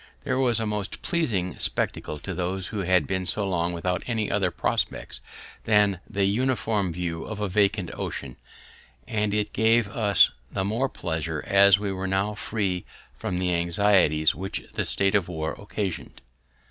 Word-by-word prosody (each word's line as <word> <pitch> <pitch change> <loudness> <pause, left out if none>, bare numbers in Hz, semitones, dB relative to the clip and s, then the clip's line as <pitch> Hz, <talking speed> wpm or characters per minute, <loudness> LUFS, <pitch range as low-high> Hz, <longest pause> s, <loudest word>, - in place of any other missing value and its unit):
This - - -1
was 125 -3 +2
a 110 - -1
most 105 -1 -4
pleasing 110 - -1
spectacle 75 - -1
to 95 +6 -6
those 90 +2 -2
who 105 - -4
had 90 -4 +3
been 95 +3 -2
so 100 0 0
long 85 -2 0
without 90 +1 -1
any 110 -4 -1
other 100 -3 +2
prospects - - -2 0.4
than 105 -4 +3
the 100 -2 +1
uniform 110 -3 +1
view 85 -1 -3
of 110 -1 -6
a 105 - 0
vacant 100 -1 +1
ocean, 65 -3 -5 0.7
and 105 -2 0
it 105 0 -1
gave 115 0 +3
us 105 -3 +4 0.2
the 95 - -1
more 115 +6 0
pleasure 80 -5 -3
as 100 0 +6
we 100 -1 -2
were 95 0 -3
now 95 +2 0
free 100 -4 -2 0.3
from 90 - -3
the 90 -1 0
anxieties 85 -3 +3
which 95 +1 -4
the - - -1
state 95 -1 +2
of 100 -4 +2
war 80 -3 -3
occasion'd. 100 -2 -5
100 Hz, 165 wpm, -26 LUFS, 90-105 Hz, 0.7 s, as